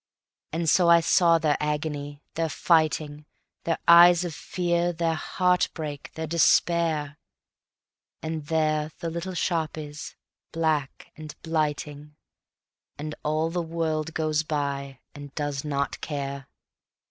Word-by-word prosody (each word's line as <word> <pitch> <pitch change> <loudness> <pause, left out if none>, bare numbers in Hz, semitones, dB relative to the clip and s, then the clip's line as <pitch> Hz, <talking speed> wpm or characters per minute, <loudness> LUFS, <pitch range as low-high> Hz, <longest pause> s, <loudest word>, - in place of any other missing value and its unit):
And 165 +1 -2
so 175 +2 +4
I 170 0 +8
saw 170 0 +4
their 155 -2 +1
agony, 150 -1 -3
their 165 0 -1
fighting, 155 -2 +1 0.4
Their 165 - 0
eyes 175 +1 +8
of 170 - -4
fear, 175 +1 -1
their 165 -1 0
heartbreak, 160 -4 -1
their 160 - -3
despair; 160 -2 +2 1.0
And 160 -2 -4
there 155 -1 0
the 165 - -4
little 175 +3 -5
shop 165 -3 -1
is, 150 0 -8 0.4
black 155 -4 -1
and 155 -2 -10
blighting, 150 -2 -3 0.8
And 150 +1 -5
all 155 +2 0
the 175 0 -1
world 160 -1 -2
goes 155 -1 +1
by 140 -3 -3
and 145 -1 -11
does 145 -3 -3
not 140 -2 -2
care. 140 -2 -5
155 Hz, 125 wpm, -26 LUFS, 150-165 Hz, 1.0 s, I